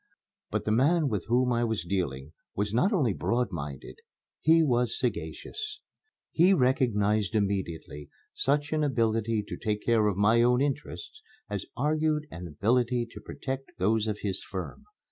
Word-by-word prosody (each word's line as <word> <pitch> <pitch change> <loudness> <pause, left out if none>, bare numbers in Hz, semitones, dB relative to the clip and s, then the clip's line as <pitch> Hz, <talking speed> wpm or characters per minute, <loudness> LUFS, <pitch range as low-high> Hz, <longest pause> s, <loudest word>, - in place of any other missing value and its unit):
But - - -2
the 105 - +1
man 145 +6 +3
with 105 -7 -2
whom 125 +1 +2
I 120 0 +1
was 110 -6 -1
dealing 80 -6 -3 0.2
was 105 +1 -1
not 180 - +3
only 140 - +2
broad 120 +2 0
minded, 70 -5 -7 0.4
he 165 +1 +5
was 125 -4 +2
sagacious. 125 - -3 0.5
He 180 +4 +5
recognized 110 - +2
immediately 90 -8 -2 0.2
such 145 +2 0
an 155 -1 +1
ability 115 -5 +1
to - - -5
take 105 -2 -2
care 115 -3 +3
of 100 -3 0
my 110 +3 +4
own 125 +1 +4
interests 150 - -3 0.3
as 100 -1 -3
argued 150 +2 +1
an 85 +2 -7
ability 120 - +1
to 105 - -10
protect 135 +5 -6
those 110 +3 +1
of 105 -1 -3
his 100 -3 -1
firm. 95 - -7
115 Hz, 155 wpm, -28 LUFS, 100-135 Hz, 0.5 s, he